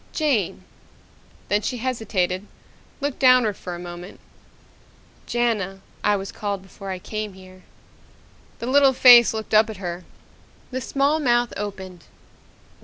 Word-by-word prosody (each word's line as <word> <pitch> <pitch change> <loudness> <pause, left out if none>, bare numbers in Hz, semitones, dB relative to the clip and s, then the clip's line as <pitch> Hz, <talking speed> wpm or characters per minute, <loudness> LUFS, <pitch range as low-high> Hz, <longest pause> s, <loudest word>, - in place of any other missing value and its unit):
"Jane." 230 - 0 0.8
Then 205 +2 +1
she 250 - -3
hesitated, 210 -6 -2 0.5
looked 285 -1 -3
downward 255 -5 +5
for 180 -1 -7
a - - -8
moment. 175 +1 -9 1.1
"Jana, 210 -6 -1 0.2
I 210 - +3
was 195 0 -5
called 200 -2 -4
before 195 +1 -10
I 190 - -3
came 215 +2 -5
here." 185 0 -15 1.0
The - - -6
little 270 +1 +4
face 245 -2 +8
looked 220 0 -6
up 215 +1 +5
at 215 - -7
her. 175 -1 -5 0.7
The 260 +1 -3
small 280 +5 +1
mouth 240 -4 +1
opened. 190 -4 -7
210 Hz, 130 wpm, -23 LUFS, 190-245 Hz, 1.1 s, face